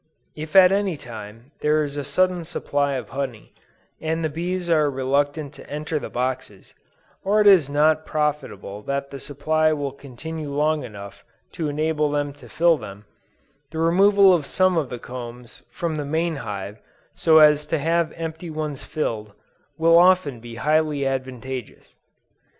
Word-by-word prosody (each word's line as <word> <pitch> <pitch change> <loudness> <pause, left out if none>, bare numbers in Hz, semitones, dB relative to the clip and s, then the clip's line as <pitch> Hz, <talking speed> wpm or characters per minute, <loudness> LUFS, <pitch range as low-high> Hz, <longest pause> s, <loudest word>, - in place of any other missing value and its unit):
If 155 +2 -8
at 185 -1 +8
any 195 -4 0
time 115 +1 -10
there 150 +1 +2
is 145 -1 -5
a 145 - -3
sudden 180 +5 +1
supply 145 -4 -1
of 130 - -4
honey, 130 -5 -5 0.5
and 160 +1 -1
the 155 - -1
bees 175 +2 -3
are 155 -3 +3
reluctant 145 +2 -1
to - - -13
enter 150 +1 -3
the - - -7
boxes, 125 -5 -4 0.5
or 205 +2 +2
it 210 - +4
is 185 -9 +6
not 155 +2 +3
probable 150 -11 -3
that 140 +4 -3
the 140 - -7
supply 155 +3 +1
will 145 -2 -3
continue 145 +3 -7
long 150 +1 +1
enough 100 -2 -10 0.3
to 160 -4 -3
enable 150 0 0
them 145 -1 -1
to 145 - -15
fill 170 -1 +3
them, 100 -1 -10 0.6
the 160 - -8
removal 190 +4 +5
of 155 -5 0
some 185 -1 +2
of 155 -6 0
the 125 - -5
combs 120 0 -9
from 170 -4 -3
the 150 - -2
main 160 +2 -1
hive 105 -3 -6 0.3
so 160 -1 +4
as 150 -1 +6
to 160 - 0
have 165 +2 +1
empty 165 +1 -6
ones 155 -3 -4
filled, 110 -9 -3 0.4
will 165 +1 +6
often 180 -8 +4
be 115 0 -10
highly 150 +1 +1
advantageous. 130 -2 -5
150 Hz, 160 wpm, -23 LUFS, 130-160 Hz, 0.6 s, at